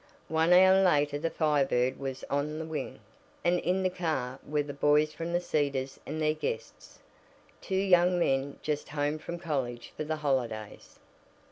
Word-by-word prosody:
One 160 +2 +2
hour 190 +1 +7
later 145 -5 +2
the 165 +2 -1
Fire 150 -3 +2
Bird 125 -1 0
was 135 -1 -5
"on 145 +2 -1
the 160 - -4
wing," 160 -1 -5 0.4
and 175 0 +3
in 185 +3 0
the 185 - +2
car 155 -8 -2
were 150 0 -1
the 145 0 -7
boys 150 +2 +3
from 165 +1 -5
The 175 - +2
Cedars 140 -5 -1
and 155 +2 -4
their 155 -1 +2
guests, 470 - -6 0.6
two 190 - -3
young 180 -2 +4
men 140 -4 0
just 150 -1 -2
home 145 +1 -1
from 170 +2 -6
college 135 -8 -4
for - - -3
the 155 +1 -2
holidays. 125 -8 -3
150 Hz, 170 wpm, -29 LUFS, 140-170 Hz, 0.6 s, hour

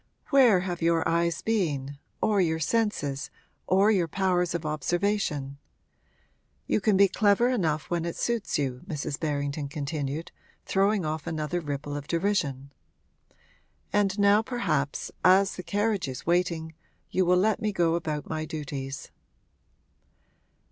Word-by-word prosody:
'Where 245 -9 +6
have 180 -2 -4
your 165 0 +2
eyes 170 0 0
been, 145 -11 -1 0.2
or 210 -2 +3
your 160 -2 +1
senses, 160 -7 -1 0.4
or 195 +3 +4
your 185 -5 +2
powers 180 -1 0
of 170 -2 -3
observation? 155 -3 -1 1.1
You - - +1
can 205 -2 +3
be 200 0 +7
clever 205 +5 +3
enough 160 -11 0
when 170 -1 0
it 170 0 -3
suits 235 -3 -1
you!' 130 -3 -2
Mrs. 150 -4 -4
Berrington 145 -1 -2
continued, 145 +1 -4 0.3
throwing 195 -1 +2
off 155 +1 -3
another 160 +1 -2
ripple 145 -1 -4
of 145 0 -6
derision. 165 -7 -1 1.2
'And 205 -1 +2
now 200 +1 +5
perhaps, 225 - -2
as 190 +1 +5
the - - -5
carriage 205 -2 0
is 130 -2 -6
waiting, 170 -2 0 0.4
you 185 - +2
will 180 0 +4
let 215 +4 +2
me 215 -1 0
go 170 -4 +2
about 155 -3 -2
my 155 -1 -3
duties.' 140 -4 -6
170 Hz, 135 wpm, -27 LUFS, 150-200 Hz, 1.2 s, be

